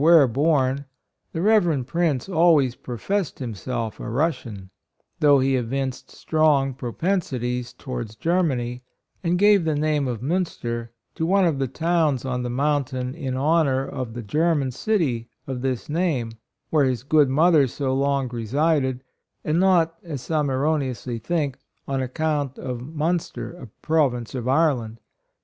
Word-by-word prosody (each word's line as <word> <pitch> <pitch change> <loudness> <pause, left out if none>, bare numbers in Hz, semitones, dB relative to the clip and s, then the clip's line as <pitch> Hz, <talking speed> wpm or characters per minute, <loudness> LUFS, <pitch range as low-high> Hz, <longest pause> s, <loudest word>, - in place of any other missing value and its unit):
where 160 -3 +7
born, 140 +1 +1 0.5
the 165 - -3
Rev. 175 - +3
Prince 155 -2 0
always 160 -8 +4
professed 160 - -3
himself 115 -1 -4
a - - -5
Russian, 115 - -2 0.5
though 145 -2 +6
he 135 0 +2
evinced 130 +2 -3
strong 150 -4 +2
propensities 125 - -2
to - - -21
wards 120 -4 -4
Germany, 130 -7 0 0.4
and 175 0 +1
gave 205 -1 +5
the 160 -2 0
name 150 -2 +1
of 120 -2 -4
Munster 120 -8 -2 0.2
to - - -4
one 195 +1 +4
of 155 -5 +1
the 135 - 0
towns 155 -1 +1
on 125 -1 -2
the 125 - -3
mountain 130 -1 -1
in 135 -4 -4
honor 140 -2 +2
of 125 -4 -5
the 120 - -5
German 150 +3 +1
city 130 - -1 0.2
of 130 -2 -4
this 130 -2 -2
name, 150 -8 0 0.4
where 150 -3 +4
his 125 -3 -1
good 145 0 +4
mother 155 0 +4
so 130 +1 -2
long 140 0 +1
resided, 130 +3 0 0.4
and 155 +3 +1
not, 170 -3 +3
as 150 -7 -6
some 150 -2 0
erroneously 130 -4 -1
think, 145 +1 -2 0.3
on 135 -1 -1
account 145 0 -1
of 125 -2 -5
Munster, 160 +5 -2
a 175 -8 -10 0.2
Province 135 -7 +1
of 125 -2 -4
Ireland. 130 -6 +1
140 Hz, 145 wpm, -23 LUFS, 125-160 Hz, 0.5 s, where